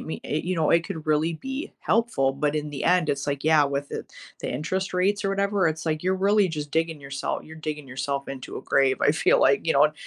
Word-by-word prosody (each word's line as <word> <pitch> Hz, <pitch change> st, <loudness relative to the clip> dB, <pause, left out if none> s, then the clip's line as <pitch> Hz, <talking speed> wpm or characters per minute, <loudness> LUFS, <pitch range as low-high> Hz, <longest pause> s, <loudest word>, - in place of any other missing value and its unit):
me 160 Hz, -, -6 dB
a 150 Hz, -, -1 dB
you 180 Hz, +2 st, -2 dB
know, 160 Hz, -2 st, +2 dB
it 170 Hz, 0 st, +4 dB
could 160 Hz, -5 st, -6 dB
really 155 Hz, +2 st, +2 dB
be 265 Hz, -, -5 dB
helpful. 220 Hz, -, +1 dB
But 145 Hz, +2 st, -1 dB
in 150 Hz, 0 st, -3 dB
the 145 Hz, -, -5 dB
end, 180 Hz, -3 st, +3 dB
it's 140 Hz, 0 st, -2 dB
like, 140 Hz, -1 st, -2 dB
yeah, 155 Hz, -1 st, +5 dB
with 140 Hz, 0 st, -2 dB
the -, -, -5 dB, 0.3 s
the -, -, -3 dB
interest 185 Hz, +9 st, -2 dB
rates 200 Hz, +3 st, +1 dB
or -, -, +2 dB
whatever, 200 Hz, -2 st, +1 dB
it's 160 Hz, 0 st, -4 dB
like, 155 Hz, -1 st, -1 dB
you're 185 Hz, +1 st, +1 dB
really 200 Hz, 0 st, +3 dB
just 150 Hz, -2 st, -5 dB
digging 160 Hz, 0 st, -1 dB
yoursel 140 Hz, 0 st, -4 dB
you're 160 Hz, 0 st, -11 dB
digging 150 Hz, -2 st, -5 dB
yourself 140 Hz, +2 st, -3 dB
into 130 Hz, -2 st, -7 dB
a -, -, -7 dB
grave, 135 Hz, -1 st, +3 dB
I -, -, +5 dB
feel 485 Hz, -, +3 dB
like, 425 Hz, -, +3 dB
you -, -, +3 dB
know. -, -, +4 dB
155 Hz, 245 wpm, -25 LUFS, 145-185 Hz, 0.3 s, yeah